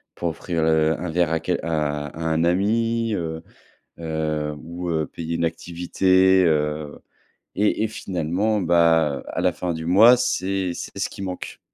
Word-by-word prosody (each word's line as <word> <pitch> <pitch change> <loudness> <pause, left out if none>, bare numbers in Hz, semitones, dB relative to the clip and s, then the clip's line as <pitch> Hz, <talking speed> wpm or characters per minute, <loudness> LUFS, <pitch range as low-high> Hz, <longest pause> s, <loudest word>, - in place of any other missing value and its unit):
pour 85 - -2
offrir 80 0 -3
le 80 -1 +2
un 90 -1 -4
verre 85 0 +1
à 80 - +1
quel 90 +2 -1
à 75 -2 -2
à 80 +3 -10
un 80 0 +1
ami, 115 +5 +1
heu, 80 -3 -4 0.6
heu, 75 -2 -2
ou, 85 +2 -6
heu, 80 -2 -1
payer 85 0 -5
une 85 - +1
activité, 95 +3 +2
heu. 75 -1 -1 0.6
Et 105 +2 +1
et - - 0
finalement, 95 +2 -1
bah, 80 -4 +3
à - - -3
la - - +2
fin 90 -2 -3
du 80 0 -6
mois, 110 +8 +7
c'est 95 -6 -1
c'est - - -7
ce - - -1
qui - - -9
manque 90 -2 -6
85 Hz, 170 wpm, -23 LUFS, 80-95 Hz, 0.6 s, mois